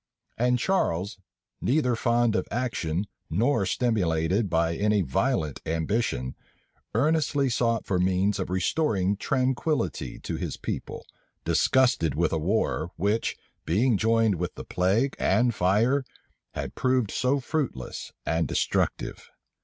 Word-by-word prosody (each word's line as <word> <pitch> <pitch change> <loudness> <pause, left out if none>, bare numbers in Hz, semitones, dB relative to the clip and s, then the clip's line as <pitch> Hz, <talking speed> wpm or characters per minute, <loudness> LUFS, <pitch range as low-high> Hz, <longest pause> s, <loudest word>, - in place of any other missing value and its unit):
And 125 +1 +2
Charles, 100 - 0 0.4
neither 125 -3 +2
fond 120 -1 +2
of - - 0
action, 105 -7 -2 0.2
nor 105 - +1
stimulated 95 -4 +1
by 85 0 +1
any 105 +1 +2
violent 75 +1 -1
ambition, 80 - -1 0.6
earnestly 145 +1 +2
sought 115 -1 +1
for 90 -2 0
means 95 +2 +1
of - - -3
restoring 95 - +1
tranquillity 130 - -1
to - - -4
his - - -4
people, - - -5 0.4
disgusted 120 - +3
with 85 +2 +1
a 80 - +1
war, 100 +8 0
which, 105 +5 0 0.3
being 110 +9 +2
joined 115 -1 +2
with 90 -1 -3
the - - -8
plague 105 +10 +1
and 120 +5 +3
fire, 110 +10 +2 0.5
had - - -4
proved 130 -4 +1
so 130 +3 +1
fruitless 135 - -3
and 80 +1 0
destructive. - - -1
105 Hz, 120 wpm, -26 LUFS, 90-125 Hz, 0.6 s, disgusted